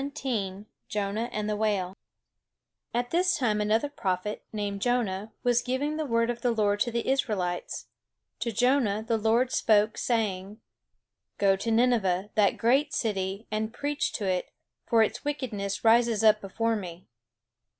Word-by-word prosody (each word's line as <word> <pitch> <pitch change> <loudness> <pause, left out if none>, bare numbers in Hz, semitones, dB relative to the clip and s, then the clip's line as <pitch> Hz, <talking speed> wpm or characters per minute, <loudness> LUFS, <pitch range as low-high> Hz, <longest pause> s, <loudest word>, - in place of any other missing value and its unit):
THE 280 - -3
STORY 240 -9 -1
OF 190 +2 -10 0.2
JONAH 210 +3 -2
AND 210 0 -3
THE 210 - 0
WHALE 200 -3 -1 1.0
At 245 +1 -2
this 360 +2 +2
time 215 -6 +1
another 220 +6 +2
prophet, 210 -7 -3
named 205 -2 -3
Jonah, 220 -4 0
was 245 -1 +3
giving 275 +4 -1
the 310 -2 -2
word 230 -1 +2
of 240 -1 -7
the 245 - +2
Lord 205 -3 +1
to 240 - +1
the 235 0 -2
Israelites. 200 -10 -1 0.5
To 235 - -2
Jonah 230 -2 +2
the 225 -1 +1
Lord 230 +4 +2
spoke, 215 0 +3
saying: 210 -3 -1 0.8
"Go 195 -1 +4
to 200 +4 -4
Nineveh, 220 -5 +2
that 205 -2 +3
great 275 +6 +2
city, 195 -1 -2
and 215 +1 -1
preach 290 +1 -1
to 210 - -3
it; 185 -1 -1 0.4
for 225 -1 +5
its 215 - -3
wickedness 230 -9 -3
rises 230 -1 +4
up 215 -1 +5
before 225 +4 -1
me." 180 -4 -7
220 Hz, 160 wpm, -28 LUFS, 200-240 Hz, 1.0 s, for